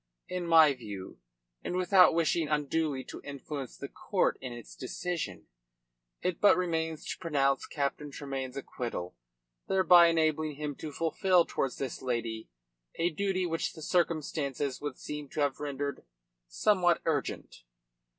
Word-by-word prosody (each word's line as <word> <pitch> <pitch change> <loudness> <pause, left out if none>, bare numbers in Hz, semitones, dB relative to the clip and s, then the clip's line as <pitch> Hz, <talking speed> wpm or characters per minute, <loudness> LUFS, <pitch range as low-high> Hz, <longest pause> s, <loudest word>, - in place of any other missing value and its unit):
In 180 -1 -3
my 160 -3 +7
view 105 -7 -8 0.4
and - - -3
without 185 -1 +6
wishing 165 -1 +2
unduly 150 -1 0
to - - -9
influence 140 -1 -6
the - - -6
court - - 0
in 130 - -5
its 120 -2 -10
decision 140 - -4 0.8
it 180 -2 -1
but 205 -2 +7
remains 160 -3 -1
to - - -5
pronounce 140 -5 +1
Captain 145 0 -2
Tremayne's 135 -2 -5
acquittal, 120 -9 -5 0.5
thereby 180 -3 +7
enabling 155 -2 +1
him 150 0 -4
to 155 - -6
fulfil 170 +3 +2
towards 135 - -2
this 135 -3 -4
lady 115 - -3 0.5
a 170 +1 +1
duty 185 +2 0
which 165 -1 -2
the 160 - -10
circumstances 150 -5 -1
would 145 -3 -4
seem 150 -1 -6
to - - -6
have 145 -2 +1
rendered 140 -1 -3 0.4
somewhat 175 - +3
urgent." 160 -3 -2
150 Hz, 140 wpm, -30 LUFS, 135-170 Hz, 0.8 s, my